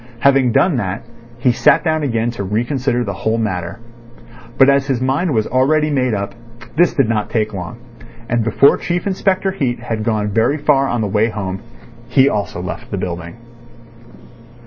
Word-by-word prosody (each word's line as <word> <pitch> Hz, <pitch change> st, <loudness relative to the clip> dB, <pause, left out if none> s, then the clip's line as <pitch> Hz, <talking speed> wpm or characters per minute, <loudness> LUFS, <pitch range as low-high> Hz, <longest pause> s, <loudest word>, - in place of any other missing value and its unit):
Having 135 Hz, -3 st, +4 dB
done 170 Hz, +1 st, +3 dB
that, 95 Hz, -2 st, -3 dB, 0.3 s
he 125 Hz, +1 st, +2 dB
sat 120 Hz, -, +3 dB
down 155 Hz, -2 st, 0 dB
again 120 Hz, -4 st, -1 dB
to 110 Hz, -4 st, -5 dB
reconsider 120 Hz, +5 st, -1 dB
the 100 Hz, -, -4 dB
whole 110 Hz, +3 st, -1 dB
matter. 95 Hz, -3 st, -3 dB, 0.8 s
But 135 Hz, -, +6 dB
as 140 Hz, 0 st, +3 dB
his 135 Hz, -4 st, 0 dB
mind 135 Hz, +7 st, 0 dB
was 110 Hz, -4 st, +1 dB
already 150 Hz, +4 st, +2 dB
made 130 Hz, -5 st, +1 dB
up, 100 Hz, 0 st, -4 dB, 0.4 s
this 175 Hz, +2 st, +3 dB
did 135 Hz, -5 st, +3 dB
not 110 Hz, -2 st, -1 dB
take 110 Hz, -2 st, -1 dB
long. 90 Hz, +2 st, -6 dB, 0.5 s
And 120 Hz, 0 st, 0 dB
before 115 Hz, +5 st, +4 dB
Chief 175 Hz, 0 st, -3 dB
Inspector 195 Hz, 0 st, 0 dB
Heat 130 Hz, -11 st, -2 dB
had 115 Hz, -2 st, -4 dB
gone 105 Hz, -2 st, 0 dB
very 115 Hz, +8 st, +1 dB
far 145 Hz, -2 st, +2 dB
on 120 Hz, -3 st, -1 dB
the 105 Hz, -, 0 dB
way 105 Hz, +3 st, +1 dB
home, 95 Hz, -3 st, -4 dB, 0.5 s
he 135 Hz, -1 st, +4 dB
also 105 Hz, -7 st, -2 dB
left -, -, -6 dB
the -, -, -3 dB
building. 85 Hz, -1 st, -5 dB
120 Hz, 175 wpm, -17 LUFS, 105-140 Hz, 0.8 s, But